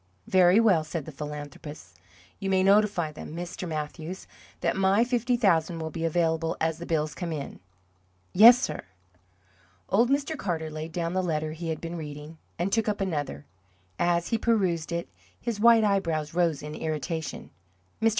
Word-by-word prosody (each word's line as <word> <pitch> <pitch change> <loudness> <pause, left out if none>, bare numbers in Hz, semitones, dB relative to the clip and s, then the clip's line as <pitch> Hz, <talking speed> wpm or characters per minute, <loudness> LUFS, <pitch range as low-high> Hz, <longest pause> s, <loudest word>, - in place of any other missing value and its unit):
"Very 185 +2 +5
well," 195 -9 +4
said 155 -1 -5
the 160 - -8
philanthropist. 145 -3 -8 0.4
"You 195 -1 -3
may 190 -1 +3
notify 195 -5 +3
them, 150 +1 -9
Mr. 175 +1 -5
Mathews, 160 +3 -5 0.4
that - - +1
my 195 +3 +3
fifty 245 0 0
thousand 175 -6 +2
will 160 -1 -4
be 165 0 -3
available 165 0 0
as 160 0 -1
the 170 - -7
bills 155 -2 0
come 175 -2 -5
in." 145 -3 -5 0.7
"Yes, 235 +6 +9
sir." - - -3 1.1
Old 235 +5 +3
Mr. 285 +3 0
Carter 165 - -3
laid 155 +1 -6
down 170 +1 -2
the 185 - +1
letter 155 -3 -1
he 165 +1 -5
had 160 - -2
been 170 +1 -6
reading, 150 +1 -8 0.2
and 180 +3 -1
took 225 -1 +2
up 205 - -2
another. 145 - -3 0.5
As 175 0 +1
he 230 - 0
perused 185 -9 +1
it 170 0 -2 0.3
his 230 -3 -3
white 230 0 +6
eyebrows 165 -7 0
rose 165 -4 +1
in 150 0 -6
irritation. 160 +1 -4 0.5
"Mr. 225 - +5
170 Hz, 170 wpm, -27 LUFS, 155-195 Hz, 1.1 s, Yes